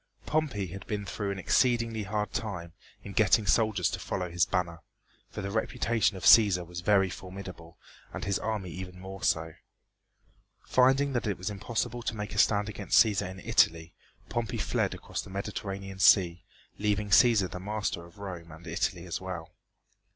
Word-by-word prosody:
Pompey 145 Hz, -10 st, 0 dB
had 95 Hz, +2 st, -9 dB
been 105 Hz, -1 st, -3 dB
through 100 Hz, +2 st, -3 dB
an 100 Hz, -, -3 dB
exceedingly 115 Hz, +2 st, +2 dB
hard 105 Hz, +1 st, -3 dB
time 90 Hz, -8 st, -4 dB, 0.3 s
in 100 Hz, -, -8 dB
getting 110 Hz, +1 st, +4 dB
soldiers 110 Hz, -5 st, +2 dB
to -, -, -4 dB
follow 90 Hz, -1 st, -3 dB
his 85 Hz, 0 st, +2 dB
banner, 85 Hz, -3 st, -1 dB, 0.5 s
for -, -, -6 dB
the 100 Hz, -, -3 dB
reputation 110 Hz, -1 st, 0 dB
of -, -, -9 dB
Cæsar 100 Hz, -6 st, +6 dB
was 90 Hz, +1 st, -7 dB
very 95 Hz, 0 st, +4 dB
formidable 90 Hz, -3 st, -9 dB, 0.3 s
and -, -, -5 dB
his 100 Hz, -1 st, 0 dB
army 105 Hz, -5 st, -3 dB
even 90 Hz, 0 st, -8 dB
more 95 Hz, +1 st, -8 dB
so. 80 Hz, -2 st, 0 dB, 1.1 s
Finding 135 Hz, +2 st, +3 dB
that 120 Hz, -3 st, -1 dB
it 100 Hz, -, -1 dB
was 95 Hz, +3 st, -4 dB
impossible 120 Hz, +4 st, -3 dB
to 115 Hz, -, -3 dB
make 105 Hz, -1 st, -5 dB
a 105 Hz, -, -1 dB
stand 105 Hz, -1 st, +3 dB
against 105 Hz, -2 st, 0 dB
Cæsar 100 Hz, -3 st, -1 dB
in 95 Hz, +1 st, -9 dB
Italy, 80 Hz, 0 st, +2 dB, 0.3 s
Pompey 115 Hz, -2 st, -2 dB
fled -, -, 0 dB
across -, -, -5 dB
the -, -, -12 dB
Mediterranean 95 Hz, -1 st, -5 dB
Sea, 90 Hz, -3 st, +5 dB, 0.4 s
leaving 105 Hz, 0 st, 0 dB
Cæsar 110 Hz, -4 st, +5 dB
the 90 Hz, -, -6 dB
master 105 Hz, -3 st, -3 dB
of 85 Hz, +1 st, -16 dB
Rome 90 Hz, -5 st, -7 dB
and 80 Hz, +2 st, -13 dB
Italy 85 Hz, +1 st, -2 dB
as 85 Hz, -, -4 dB
well. 90 Hz, -2 st, -6 dB
100 Hz, 175 wpm, -29 LUFS, 90-110 Hz, 1.1 s, Cæsar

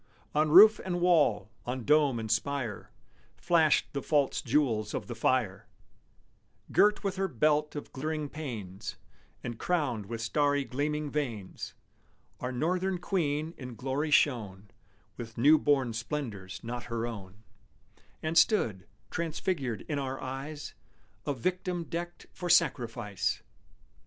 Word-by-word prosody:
On 155 Hz, +1 st, +2 dB
roof 210 Hz, +7 st, +9 dB
and 175 Hz, -2 st, -2 dB
wall, 145 Hz, -, +3 dB
on 125 Hz, 0 st, -4 dB
dome 145 Hz, -4 st, +4 dB
and 110 Hz, -1 st, -3 dB
spire, 120 Hz, -1 st, -1 dB, 0.5 s
Flashed 165 Hz, -4 st, +3 dB
the 140 Hz, -, -2 dB
false 145 Hz, -2 st, +1 dB
jewels 115 Hz, -6 st, +1 dB
of -, -, -3 dB
the 120 Hz, -, -5 dB
fire; 115 Hz, -3 st, 0 dB, 1.0 s
Girt 210 Hz, +1 st, +4 dB
with 195 Hz, -1 st, -2 dB
her 195 Hz, 0 st, +1 dB
belt 150 Hz, +1 st, +1 dB
of 145 Hz, -, -6 dB
glittering 155 Hz, +2 st, -2 dB
panes, 110 Hz, -10 st, -6 dB, 0.5 s
And 120 Hz, -2 st, -5 dB
crowned 135 Hz, -, -1 dB
with 115 Hz, +1 st, -5 dB
starry 145 Hz, +5 st, +1 dB
gleaming 145 Hz, +2 st, -2 dB
vanes, 115 Hz, -10 st, -4 dB, 0.6 s
Our 125 Hz, -, -3 dB
northern 180 Hz, +8 st, 0 dB
queen 160 Hz, -4 st, -1 dB
in 125 Hz, -3 st, -7 dB
glory 135 Hz, +6 st, -2 dB
shone 105 Hz, -9 st, +1 dB, 0.5 s
With 115 Hz, -1 st, -8 dB
new 150 Hz, +6 st, +6 dB
born 135 Hz, -5 st, +2 dB
splendors 110 Hz, -6 st, -4 dB
not 120 Hz, +1 st, -5 dB
her 115 Hz, -1 st, -2 dB
own, 105 Hz, -2 st, -8 dB, 0.8 s
And 160 Hz, +1 st, +4 dB
stood, 110 Hz, -, +2 dB, 0.2 s
transfigured 155 Hz, -, -2 dB
in 145 Hz, -2 st, -1 dB
our 135 Hz, -1 st, -3 dB
eyes, 140 Hz, +3 st, -6 dB, 0.5 s
A 145 Hz, -, +1 dB
victim 180 Hz, +5 st, -2 dB
decked 175 Hz, +1 st, -5 dB
for 180 Hz, -, -5 dB
sacrifice! 120 Hz, -, +1 dB
140 Hz, 130 wpm, -30 LUFS, 115-155 Hz, 1.0 s, roof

